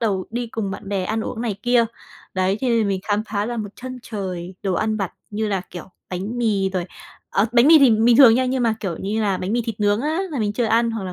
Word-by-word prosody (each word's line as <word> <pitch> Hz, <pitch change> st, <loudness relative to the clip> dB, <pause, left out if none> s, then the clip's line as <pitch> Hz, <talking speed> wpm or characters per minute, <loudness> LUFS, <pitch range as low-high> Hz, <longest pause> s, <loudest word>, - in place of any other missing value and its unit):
đầu 200 Hz, -5 st, -1 dB
đi 240 Hz, +1 st, -3 dB
cùng 220 Hz, -3 st, -4 dB
bạn 195 Hz, +1 st, -7 dB
bè 195 Hz, -2 st, -1 dB
ăn 220 Hz, +4 st, -1 dB
uống 225 Hz, +1 st, -5 dB
này 220 Hz, -5 st, -2 dB
kia. 245 Hz, -1 st, +4 dB, 0.5 s
Đấy, 190 Hz, +2 st, +1 dB
cho 265 Hz, -, -1 dB
nên 235 Hz, -1 st, +3 dB
là -, -, 0 dB
mình 195 Hz, -1 st, -1 dB
khám 210 Hz, 0 st, 0 dB
phá 205 Hz, 0 st, -1 dB
ra 240 Hz, 0 st, -3 dB
một 215 Hz, -2 st, -3 dB
chân 255 Hz, 0 st, -7 dB
trời 185 Hz, -5 st, -5 dB
đồ 190 Hz, -2 st, 0 dB
ăn 215 Hz, +3 st, 0 dB
vặt 195 Hz, -4 st, -3 dB, 0.2 s
như 215 Hz, +1 st, -2 dB
là, 195 Hz, -3 st, 0 dB
kiểu, 175 Hz, -, -7 dB, 0.3 s
bánh 195 Hz, +7 st, -4 dB
mì 205 Hz, -5 st, +1 dB
rồi 185 Hz, -2 st, -2 dB, 0.5 s
ờ, 200 Hz, +3 st, +2 dB
bánh 240 Hz, +2 st, +5 dB
mì 320 Hz, -1 st, +9 dB
thì 275 Hz, -3 st, +6 dB
bình 225 Hz, +2 st, +4 dB
thường 245 Hz, -5 st, +8 dB
nha 255 Hz, -, +2 dB
nhưng 255 Hz, 0 st, 0 dB
mà, 230 Hz, -2 st, +2 dB
kiểu 180 Hz, -5 st, -3 dB
như 210 Hz, +3 st, -2 dB
là, 200 Hz, -3 st, +1 dB
bánh 185 Hz, +4 st, -3 dB
mì 240 Hz, -, +1 dB
thịt 220 Hz, -2 st, -5 dB
nướng 205 Hz, +1 st, +2 dB
á, 310 Hz, +5 st, -1 dB
là 285 Hz, -, -3 dB
mình 210 Hz, -2 st, 0 dB
chưa 240 Hz, -, 0 dB
ăn, 230 Hz, +1 st, +2 dB
hoặc 225 Hz, -3 st, -4 dB
là 185 Hz, -, -5 dB
215 Hz, 280 wpm, -21 LUFS, 195-235 Hz, 0.5 s, mì